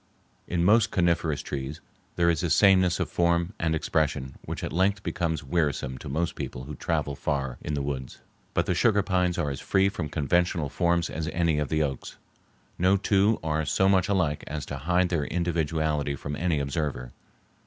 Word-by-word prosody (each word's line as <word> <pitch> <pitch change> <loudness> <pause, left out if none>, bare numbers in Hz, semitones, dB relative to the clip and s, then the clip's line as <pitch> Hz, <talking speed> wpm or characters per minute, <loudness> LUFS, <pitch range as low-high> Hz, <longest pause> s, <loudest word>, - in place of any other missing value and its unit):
In 85 -1 0
most 110 +2 +5
coniferous 85 -6 +1
trees 70 +2 -5 0.4
there 85 0 +2
is 80 -3 +2
a 85 - -1
sameness 95 -1 +4
of - - 0
form 85 +2 +1
and 80 -1 +1
expression 75 -4 -1
which - - -5
at - - -4
length 100 +3 +1
becomes 85 -2 -2
wearisome 70 -4 -1
to 75 - -8
most 80 +5 -1
people 60 - -6
who 75 +3 -7
travel 70 -1 -2
far 70 -4 -2
in 75 - -3
the 70 - -2
woods. 65 -2 -4 0.4
But - - +2
the - - +1
sugar 100 +4 +3
pines 90 -2 +1
are 75 -5 0
as 70 - -5
free 95 0 +2
from 85 -6 -4
conventional 85 +1 +1
forms 85 +1 +1
as 80 +3 -3
any 80 -1 +1
of 75 - -2
the 80 0 +1
oaks. 70 -3 -5 0.6
No 95 +2 +4
two 100 +2 +2
are 80 0 0
so 85 +6 +2
much 95 -1 +3
alike 85 -7 +1
as 75 -1 -4
to 70 - -5
hide 90 +5 +1
their 80 -5 0
individuality 80 -4 -1
from 70 +1 -5
any 85 0 0
observer. 70 -3 -3
80 Hz, 185 wpm, -27 LUFS, 75-90 Hz, 0.6 s, most